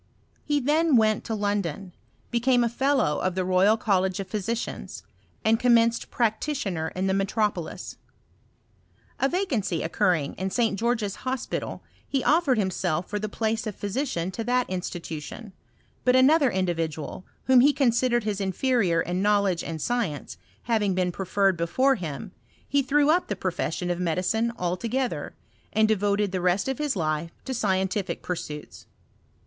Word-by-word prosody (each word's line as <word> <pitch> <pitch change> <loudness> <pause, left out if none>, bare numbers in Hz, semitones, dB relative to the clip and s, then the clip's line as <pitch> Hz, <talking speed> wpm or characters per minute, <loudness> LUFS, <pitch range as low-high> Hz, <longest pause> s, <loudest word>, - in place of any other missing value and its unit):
He 295 -1 +1
thai 305 +5 +2
went 220 -6 +4
to 225 - -2
London, 200 -3 -2 0.4
became 245 +1 +3
a 235 - +1
fellow 260 - +1
of 185 -1 -1
the 185 -1 0
Royal 185 +4 +4
College 190 -3 +1
of 195 - -4
Physicians, 215 +4 -4 0.4
and 225 +1 +4
com 245 -1 +5
menced 230 0 +2
practitioner 220 - -1
in 185 +1 -1
the 190 - +1
metropolis. 195 -2 -2 1.2
A 270 - +2
vacancy 265 - -1
occurring 170 -4 +1
in 190 +1 -1
St. 220 -1 0
George's 225 -4 0
Hospital, 255 0 -4 0.2
he 270 -3 -1
offered 305 -5 +3
him 190 -3 +1
self 175 -1 -1
for 210 - -3
the 215 +1 -3
place 220 +1 -1
of 210 - -4
physician 200 - -2
to 225 - -4
that 250 +1 +1
institution; 180 +2 -6 0.5
Imt 250 0 +4
another 275 +2 +5
individual, 165 -4 -2 0.2
whom 260 -1 +5
he 280 +4 +6
considered 245 -3 +2
his 210 -2 -2
in£erior 195 -3 +1
in 180 +2 -1
knowledge 200 -4 +2
and 160 -1 -5
science, 215 -7 -2 0.3
having 210 -5 +1
been 180 -1 +1
preferred 195 +1 +1
before 175 +12 +2
him, 180 - -5 0.4
he 285 0 +2
threw 290 +3 +3
up 355 +3 +2
the 205 - -2
profession 180 -1 -2
of 175 - -2
medicine 180 +7 0
altogether, 185 - -2 0.4
and 220 +1 +3
devoted 205 -1 +1
the 185 -1 -2
rest 180 +4 +1
of 265 +2 -2
his 295 -4 0
life 155 -2 -1 0.2
to 265 - -3
scientific 190 -3 -1
pursuits. 150 -4 -6
205 Hz, 155 wpm, -26 LUFS, 185-245 Hz, 1.2 s, he